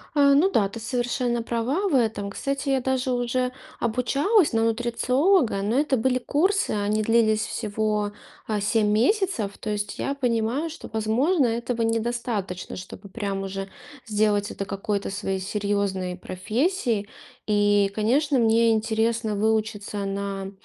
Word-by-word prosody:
А, 280 -1 +6
ну 320 +8 +5
да, 205 - +3
ты 230 +3 -8
совершенно 240 0 -1
права 255 - -1
в 290 - +1
этом. 220 -5 +1
Кстати, 275 +6 -3
я 270 -1 +2
даже 260 0 0
уже 250 +1 0 0.3
обучалась 275 - +2
на 225 - +2
нутрициолога, 240 - +2
но 215 +5 0
это 285 -3 +1
были 255 +2 +1
курсы. 375 +10 +1
Они 210 +1 0
длились 220 -1 +3
всего, 210 -1 -1 0.4
а, 210 -2 -1
7 210 +1 +2
месяцев. 240 - +1
То 215 - -6
есть 205 0 -3
я 275 - -1
понимаю, 245 +3 0
что, 325 - -9
возможно, 250 +9 +2
этого 235 0 -1
недостаточно, 225 -5 -2
чтобы 190 +2 -9
прям 195 -2 -3
уже 195 0 -4 0.4
сделать 210 -1 +1
это 195 - -4
какой-то 200 +1 -2
своей 195 0 -2
серьезной 200 -2 -1
профессией. 220 - -1 0.4
И, 205 -1 +3
конечно, 270 +6 +2
мне 230 0 +4
интересно 225 0 0
выучиться 215 -1 -1
на, 195 0 -4
225 Hz, 140 wpm, -25 LUFS, 205-255 Hz, 0.4 s, А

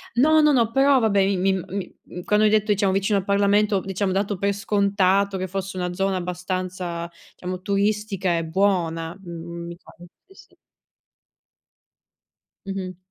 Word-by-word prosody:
No, 310 +5 +5
no, 300 -1 +5
no, 230 -4 +2
però 270 +1 +4
vabbè, 215 -3 +2
i 195 0 +2
mi 190 +1 +2
mi 190 +1 -5
mhmm, 180 - -9
quando 210 +1 +3
hai 210 - +4
detto 215 0 +2
diciamo 200 -1 +2
vicino 200 +1 +1
al 190 - -1
Parlamento, 200 0 +2
diciamo 195 0 -2
ho - - -1
dato 200 0 -1
per 200 +2 0
scontato 200 -1 +1
che 185 - -3
fosse 190 +1 -5
una 180 -1 -2
zona 195 +1 0
abbastanza, 180 -1 -4 0.3
diciamo, 185 0 -6
turistica 200 -2 0
e 165 - -2
buona, 165 -2 0
m 170 0 -7
mi 170 - -8
pare 175 - -15 0.2
sì, 385 - -19
sì. - - -19 2.1
Mh-mh. 190 -2 -5
195 Hz, 165 wpm, -23 LUFS, 180-205 Hz, 2.1 s, No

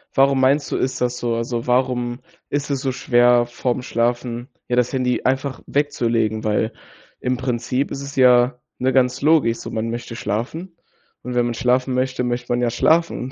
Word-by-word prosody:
Warum 135 0 +4
meinst 140 +2 +2
du, - - 0
ist 130 0 -2
das 125 0 0
so? 120 -1 -1
Also, 115 +1 -3
warum 125 -1 0 0.3
ist 145 0 -2
es 135 - -1
so 135 - -1
schwer, 120 -1 +3
vorm 120 +1 -2
Schlafen, 120 +2 -2 0.2
ja, 120 - 0
das 125 0 +2
Handy 125 -2 0
einfach 135 +1 -1
wegzulegen? 115 -6 0
Weil 110 +1 0 0.5
im 125 0 -1
Prinzip 125 +1 -2
ist 140 - -4
es 140 0 -8
ja 125 -1 +4 0.2
ne, 130 +1 +1
ganz 125 -1 +2
logisch 145 -7 +3
so. - - -7
Man 115 +1 -3
möchte 120 0 -6
schlafen. 130 - -4 0.5
Und 125 0 -6
wenn 120 -1 +2
man 120 - -1
schlafen 125 +1 +1
möchte, 130 0 -1
möchte 120 0 -3
man 120 0 +1
ja 120 - +2
schlafen 160 -2 +1
125 Hz, 185 wpm, -21 LUFS, 120-130 Hz, 0.5 s, Warum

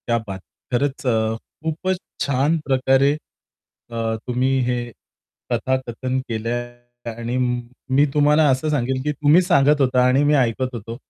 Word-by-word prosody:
क्या 120 -1 +2
बात! 95 -1 -5 0.3
खरंच, 135 +2 -1
अ, 110 -2 +1 0.3
खूपच 165 +4 -1 0.3
छान 140 +4 +1
प्रकारे 135 +1 +3 0.8
अ, 115 -1 -2
तुम्ही 125 +1 +1 0.2
हे 125 0 0 0.7
कथाकथन 130 0 -1
केलंय 120 +1 -5
आणि 115 +2 -4
म 125 -1 0 0.4
मी 145 +2 +5
तुम्हाला 150 +1 +4
असं 130 +4 +1
सांगेल 130 -2 0
की 150 - 0
तुम्ही 150 +4 +4
सांगत 150 -5 +3
होता 125 -1 +3
आणि 130 +3 +3
मी 145 +1 +3
ऐकत 130 -1 +1
होतो. 115 +1 -6
130 Hz, 140 wpm, -21 LUFS, 120-145 Hz, 0.8 s, मी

